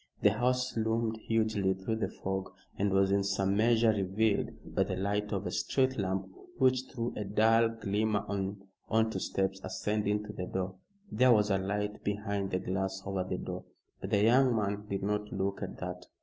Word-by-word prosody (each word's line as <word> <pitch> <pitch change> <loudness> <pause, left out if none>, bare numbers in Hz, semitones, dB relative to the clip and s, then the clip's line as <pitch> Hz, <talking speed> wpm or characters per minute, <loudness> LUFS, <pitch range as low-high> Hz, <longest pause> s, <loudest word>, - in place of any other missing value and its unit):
The 105 - +7
house 125 +3 0
loomed 110 0 0
hugely 110 -4 +2
through 95 +4 -2
the 110 - -1
fog 95 0 -4 0.2
and 100 0 +1
was 95 0 +3
in 100 0 +3
some 100 0 +1
measure 115 +1 +4
revealed 100 +1 +1 0.2
by - - +2
the 95 - -3
light 105 +2 -1
of - - -2
a - - -2
street 130 -1 +1
lamp 95 0 -1 0.3
which 130 -3 +3
threw 120 -1 -3
a 105 - -2
dull 110 +3 +4
glimmer 110 -1 -1 0.6
on 110 0 +3
to - - -2
steps 95 0 -1
ascending 105 0 -1
to 105 0 -8
the 90 -2 -4
door. 95 0 -2 0.4
There 125 +3 +5
was 105 -2 +4
a 95 - +3
light 105 +2 -2
behind 100 -1 -2
the 90 - 0
glass 95 +1 -2
over 95 -1 -1
the 95 - -3
door, - - -6 0.3
but - - -5
the 100 0 +3
young 125 +2 +5
man 105 -1 -1
did 100 -1 -2
not 105 +1 -1
look 95 +1 -2
at 100 - -5
that. 90 0 -6
105 Hz, 190 wpm, -31 LUFS, 95-110 Hz, 0.6 s, The